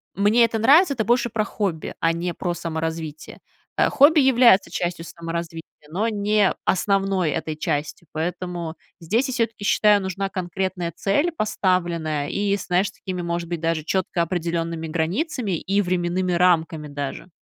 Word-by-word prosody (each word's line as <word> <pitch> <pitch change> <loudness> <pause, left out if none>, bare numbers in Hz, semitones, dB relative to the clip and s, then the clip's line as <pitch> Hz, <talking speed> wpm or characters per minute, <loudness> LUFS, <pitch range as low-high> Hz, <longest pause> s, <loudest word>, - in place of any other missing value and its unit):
"мне 215 +4 +4
это 225 -1 -2
нравится"- 285 - +5
это 220 -4 -2
больше 240 +1 +2
про 215 0 0
хобби, 195 -6 -3
а 165 0 +2
не 170 +1 -3
про 175 -2 -2
саморазвитие. 160 -2 -5 0.4
Э, - - +3
хобби 300 +3 +6
является 245 -7 +5
частью 175 -1 -3
саморазвития, 165 -1 -5 0.3
но 210 +8 0
не 210 -1 +2
основной 195 -4 +1
этой 160 -1 -3
частью, 155 +1 -3
поэтому 170 0 -4 0.3
здесь, 220 +10 0
я - - -2
всё-таки 230 -4 -2
считаю, 205 0 +4
нужна 190 +1 -3
конкретная 185 -1 -3
цель 290 - +1
поставленная, 170 - -1
и, 200 0 0
знаешь, 185 +1 0
такими, 185 -3 -6
может 170 0 -3
быть, 170 -2 -3
даже 165 -1 0
четко 185 -1 0
определенными 170 -1 -2
границами 200 - -1
и 200 +4 0
временными 180 0 0
рамками 165 -3 +2
даже. 145 +4 -5
180 Hz, 150 wpm, -23 LUFS, 165-205 Hz, 0.4 s, хобби